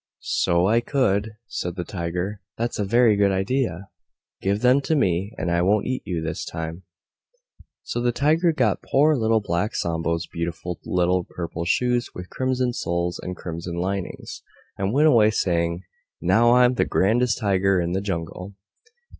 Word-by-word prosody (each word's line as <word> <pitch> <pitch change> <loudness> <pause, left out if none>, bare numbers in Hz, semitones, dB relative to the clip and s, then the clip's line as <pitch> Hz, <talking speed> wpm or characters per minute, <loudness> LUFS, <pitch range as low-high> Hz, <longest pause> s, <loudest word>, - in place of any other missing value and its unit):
"So 85 +1 +3
I 115 +3 +3
could," 110 -6 0
said 90 -5 -4
the 90 - -3
Tiger: 90 +3 -4 0.2
"that's 120 -1 -2
a - - +1
very 115 +1 +4
good 100 -1 +3
idea. 95 -2 -1 0.5
Give 100 +2 0
them 125 +3 +4
to 160 - 0
me, 95 - +1
and 90 - -2
I 85 0 +2
won't 100 +4 +2
eat 130 0 -2
you 85 -3 -2
this 80 - -3
time." 80 +1 -5 1.0
So 120 - -3
the 120 0 +2
Tiger 155 +7 +2
got 125 -10 +1
poor 150 +3 +3
Little 110 -3 +2
Black 100 +4 -2
Sambo's 85 0 -1
beautiful 85 +1 -5
little 90 0 +1
Purple 85 -1 -5
Shoes 125 +5 +1
with 90 0 -8
Crimson 130 -1 0
Soles 85 -4 -2
and 90 0 -6
Crimson 85 0 -6
Linings, 95 +2 -4 0.3
and 95 +1 -1
went 145 +6 +4
away 115 -7 +5
saying, 85 -4 0 0.4
"Now 115 +7 +4
I'm 125 0 +5
the - - +1
grandest 115 +4 +2
Tiger 95 -2 +2
in 85 0 -1
the 95 +2 -1
Jungle." 90 0 -5
95 Hz, 165 wpm, -23 LUFS, 85-120 Hz, 1.0 s, away